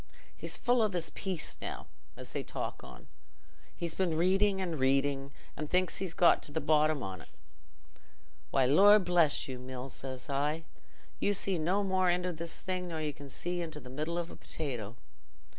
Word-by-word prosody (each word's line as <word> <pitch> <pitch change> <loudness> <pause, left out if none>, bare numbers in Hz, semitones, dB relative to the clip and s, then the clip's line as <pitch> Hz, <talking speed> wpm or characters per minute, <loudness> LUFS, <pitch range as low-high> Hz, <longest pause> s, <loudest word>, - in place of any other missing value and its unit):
He's - - -3
full 245 -1 +3
o' 215 - +4
this 175 -5 -3
peace 185 -5 -2
now, - - -5 0.3
as - - -9
they - - -2
talk - - -5
on; - - -12 0.7
he's 170 -1 -3
been 175 -4 0
reading 190 +3 +3
and 170 -5 -2
reading, 135 +1 +2 0.2
and 150 -1 -5
thinks 180 -1 +1
he's 185 -3 -3
got 175 - +5
to - - -6
the 160 - -1
bottom 155 -2 +3
on't. 95 -3 -6 1.2
'Why, 135 - +3
Lor' 195 +11 +8
bless 175 -6 +3
you, 130 -2 -5
Mills,' 130 +1 -7
says 130 -2 -7
I, 145 +3 0 0.6
'you 205 - +2
see 190 -2 +1
no 185 +6 +1
more 190 -2 +2
into 180 0 +1
this 165 +1 -4
thing 185 -1 -2
nor 165 -2 -4
you 150 -1 -2
can 140 0 -11
see 175 +5 -3
into 160 -3 -5
the 125 -2 -11
middle 155 +5 -2
of 170 -1 -3
a - - -9
potato. 120 -8 -4
160 Hz, 180 wpm, -32 LUFS, 140-180 Hz, 1.2 s, Lor